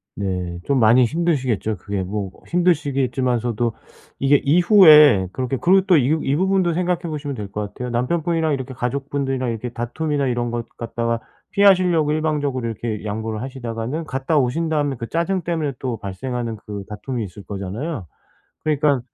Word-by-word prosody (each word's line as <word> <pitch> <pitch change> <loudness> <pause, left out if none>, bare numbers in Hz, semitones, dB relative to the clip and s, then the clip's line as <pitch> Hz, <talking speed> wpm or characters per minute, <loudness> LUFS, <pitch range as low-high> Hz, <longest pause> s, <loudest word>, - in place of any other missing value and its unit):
네. 90 -3 -3
좀 140 -2 +2
많이 120 +2 +6
힘드시겠죠. 130 - 0
그게 100 +1 -3
뭐 100 +1 -3
꼭 - - -21
힘드시겠지만서도 130 - 0 0.5
이게 135 +1 +4
이후에 150 - +7
그렇게 130 +4 -2
그리고 190 +2 +4
또 180 - +6
이 130 - +2
부 160 - -3
이 135 +1 +1
부분도 185 -1 +2
생각해 180 0 0
보시면 150 -4 -4
될 105 -3 -5
것 105 - -3
같아요. 125 0 -5
남편분이랑 160 +6 0
이렇게 130 -1 -4
가족분들이랑 135 0 -2
이렇게 115 +2 -4
다툼이나 140 +5 -2
이런 120 -1 -1
것 120 -1 -4
갖다가 115 0 -2 0.3
피하시려고 180 -6 +4
일방적으로 145 -5 -1
이렇게 110 -1 -4
양보를 110 +1 -3
하시다가는 125 +3 -4
갔다 135 +2 -1
오신 145 +5 +1
다음에 145 -3 0
그 115 - -5
짜증 180 +3 0
때문에 160 -4 -2
또 125 -4 -3
발생하는 115 +4 -4
그 100 -1 -6
다툼이 115 +3 -4
있을 100 +1 -9
거잖아요. 100 - -5 0.6
그러니까 150 -3 +2
130 Hz, 410 characters per minute, -21 LUFS, 115-155 Hz, 0.6 s, 이후에